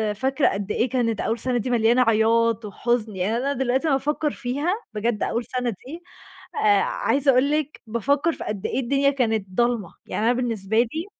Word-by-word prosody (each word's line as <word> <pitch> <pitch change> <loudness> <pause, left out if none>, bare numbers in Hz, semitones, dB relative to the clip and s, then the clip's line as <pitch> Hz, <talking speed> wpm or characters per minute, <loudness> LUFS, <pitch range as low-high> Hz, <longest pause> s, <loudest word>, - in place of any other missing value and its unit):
فاكرة 265 +5 +1
قد 200 +1 -4
إيه 245 - 0
كانت 230 -3 0
أول 230 +1 -1
سَنة 250 0 -1
دي 240 +2 -2
مليانة 240 +1 +3
عياط 230 0 +2
وحُزن، 220 0 -1
يعني 200 +5 0
أنا 275 +3 -1
دلوقتي 265 +4 0
لمّا 275 - +3
أفكّر 295 +2 -1
فيها 275 +7 -2 0.2
بجد 215 0 -1
أقول 235 +1 -1
سَنة 250 -1 -2
دي 270 - -8 0.5
آآ، 205 -2 +3
عايزة 275 0 +1
أقول 260 +3 +3
لِك 300 -1 -2
بافكّر 280 +8 +1
في - - -7
قد 205 -2 -5
إيه - - -1
الدنيا 275 +2 +2
كانت 225 -7 0
ضلمة، 235 -2 0
يعني 215 - -2
أنا 240 - +4
بالنسبة 225 -4 -2
لي 315 +8 -3
240 Hz, 190 wpm, -23 LUFS, 220-270 Hz, 0.5 s, أنا